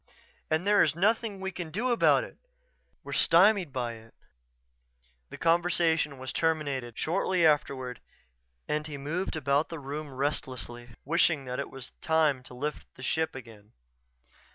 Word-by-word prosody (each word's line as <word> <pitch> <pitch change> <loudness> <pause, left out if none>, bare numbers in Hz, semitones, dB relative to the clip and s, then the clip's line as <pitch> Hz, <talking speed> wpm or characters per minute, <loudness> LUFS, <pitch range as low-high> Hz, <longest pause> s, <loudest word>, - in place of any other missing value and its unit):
And 160 +3 +1
there 205 0 +5
is 155 -2 +3
nothing 210 +2 +1
we 190 0 -3
can 175 -4 -6
do 225 +10 -1
about 240 - +4
it. - - -10 0.7
We're - - -7
stymied 185 -1 +5
by 120 -3 -2
it...." 115 0 -15 1.1
The - - -9
conversation 165 -3 +2
was 130 0 -6
terminated 140 -7 -1
shortly 180 +1 +1
afterward 135 -5 +1 0.7
and 150 0 -1
he 150 -2 -6
moved 160 +8 -3
about 145 0 +1
the 165 - -5
room 145 +1 -6
restlessly, 125 -4 -3
wishing 155 -2 +2
it 125 +2 -3
was 135 -1 -9
time 155 -5 +2
to 125 - -10
lift 150 +4 -4 0.2
ship 160 +3 0
again. 110 -5 -12
150 Hz, 140 wpm, -29 LUFS, 130-170 Hz, 1.1 s, there